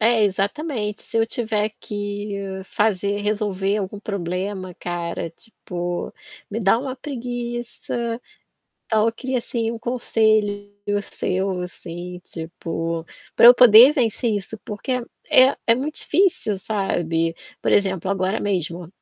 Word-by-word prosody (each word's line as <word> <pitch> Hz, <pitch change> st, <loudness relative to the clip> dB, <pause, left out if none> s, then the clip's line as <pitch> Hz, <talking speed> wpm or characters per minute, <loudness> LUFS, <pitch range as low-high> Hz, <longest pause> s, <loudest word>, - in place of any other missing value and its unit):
É, 225 Hz, 0 st, +4 dB
exatamente, 210 Hz, -, -1 dB
se -, -, -5 dB
eu 225 Hz, -, +3 dB
tiver 220 Hz, -2 st, 0 dB
que 205 Hz, -2 st, -4 dB
fazer 200 Hz, -1 st, 0 dB
resolver 205 Hz, -1 st, 0 dB
algum 200 Hz, 0 st, -4 dB
problema, 185 Hz, -1 st, -3 dB
cara, 170 Hz, -1 st, -3 dB
tipo, 175 Hz, -2 st, -6 dB, 0.3 s
me 220 Hz, +3 st, -3 dB
dá 195 Hz, +2 st, +4 dB
uma 260 Hz, 0 st, -4 dB
preguiça, 240 Hz, -2 st, -4 dB, 0.7 s
então, 215 Hz, -1 st, +2 dB
eu 230 Hz, -, +2 dB
queria 260 Hz, +3 st, -3 dB
assim, 230 Hz, -1 st, -2 dB
um 230 Hz, -, -5 dB
conselho 215 Hz, -4 st, +1 dB, 0.3 s
seu 190 Hz, 0 st, -1 dB
assim, 180 Hz, 0 st, -7 dB
tipo, 165 Hz, 0 st, -4 dB, 0.3 s
pra -, -, +6 dB
eu 240 Hz, +1 st, +12 dB
poder 245 Hz, +2 st, +9 dB
vencer 235 Hz, -4 st, +1 dB
isso, 205 Hz, +1 st, -3 dB
porque 245 Hz, +4 st, -3 dB, 0.3 s
é 260 Hz, +2 st, +7 dB
é 230 Hz, -, +6 dB
muito 285 Hz, +5 st, -3 dB
difícil 330 Hz, -, +1 dB
sabe, 170 Hz, -5 st, -1 dB, 0.3 s
por -, -, 0 dB
exemplo, 190 Hz, -2 st, +2 dB
agora 195 Hz, +2 st, 0 dB
mesmo 175 Hz, -3 st, -2 dB
205 Hz, 125 wpm, -22 LUFS, 185-230 Hz, 0.7 s, eu